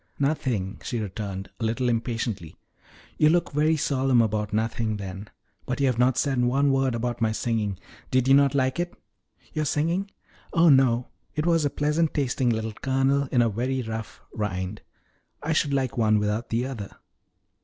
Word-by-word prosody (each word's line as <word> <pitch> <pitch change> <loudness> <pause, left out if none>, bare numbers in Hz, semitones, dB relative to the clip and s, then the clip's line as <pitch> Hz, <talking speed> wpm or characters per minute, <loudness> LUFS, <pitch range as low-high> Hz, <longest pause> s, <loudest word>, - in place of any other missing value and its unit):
"Nothing," 125 -9 -1
she 120 - -3
returned, 100 -2 -5
a - - -4
little 115 +3 0
impatiently. 115 -7 -2 0.6
"You 150 - +6
look 175 +2 +2
very 155 +2 +2
solemn 135 -4 +2
about 105 -2 +1
nothing, 110 0 -1
then. 100 +1 -7 0.4
But 125 +2 -2
you 140 - +3
have 125 -3 +1
not 125 0 +3
said 135 -4 +1
one 135 +3 +3
word 135 -2 +1
about 120 0 -3
my 110 -1 +2
singing 110 -3 -1 0.3
did 130 0 +2
you 135 - +6
not 140 0 +5
like 130 +3 +1
it?" 175 0 -2 0.6
"Your 155 - 0
singing? 170 +7 0 0.4
Oh 165 0 +5
no! 130 -3 +4 0.3
It 150 - -1
was 165 -3 +3
a - - +2
pleasant 150 +3 0
tasting 130 -3 +1
little 110 -1 -1
kernel 135 +3 +1
in 120 -2 +4
a 115 - +2
very 125 +4 -1
rough 110 0 -6
rind 95 -1 -3 0.6
I 160 +2 0
should 150 -2 +1
like 135 -3 0
one 110 -1 +4
without 105 +2 -1
the 115 +2 0
other." 115 -7 -6
125 Hz, 175 wpm, -25 LUFS, 110-140 Hz, 0.6 s, You